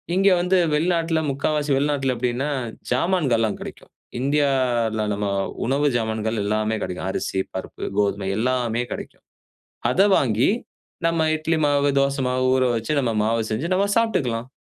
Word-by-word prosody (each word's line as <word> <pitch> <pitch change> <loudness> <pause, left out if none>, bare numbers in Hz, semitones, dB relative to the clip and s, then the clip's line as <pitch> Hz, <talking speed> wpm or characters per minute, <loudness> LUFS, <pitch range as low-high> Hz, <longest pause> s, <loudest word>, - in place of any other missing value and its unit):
இங்க 195 +1 +3
வந்து 180 +2 +2 0.2
வெளிநாட்ல 165 0 +1
முக்காவாசி 145 +2 -1
வெளிநாட்ல 140 -2 0
எப்டின்னா, 125 +3 -1 0.4
ஜாமான்கள்லாம் 125 - +1
கிடைக்கும் - - -10 0.3
இண்டியால 130 -6 +1
நம்ம 100 0 -2 0.4
உணவு 140 +2 +2
ஜாமான்கள் 110 -1 -1
எல்லாமே 110 +1 0
கெடைக்கும். 90 +1 -4
அரிசி, 95 - -2
பருப்பு, 95 - -6 0.2
கோதுமை 100 -1 0
எல்லாமே 120 -1 0
கெடைக்கும். - - -7 0.7
அத 195 +9 +4
வாங்கி, 115 - +2 0.6
நம்ம 165 -1 +1
இட்லி 160 +1 0
மாவு, 145 0 +2
தோச 140 0 +1
மாவு 130 0 0
ஊறவச்சு, 125 0 +1
நம்ம 120 -4 0
மாவு 115 +1 +1
செஞ்சு 120 +10 -2
நம்ம 200 +2 +2
சாப்ட்டுக்லாம். 130 - 0
130 Hz, 130 wpm, -23 LUFS, 115-150 Hz, 0.7 s, அத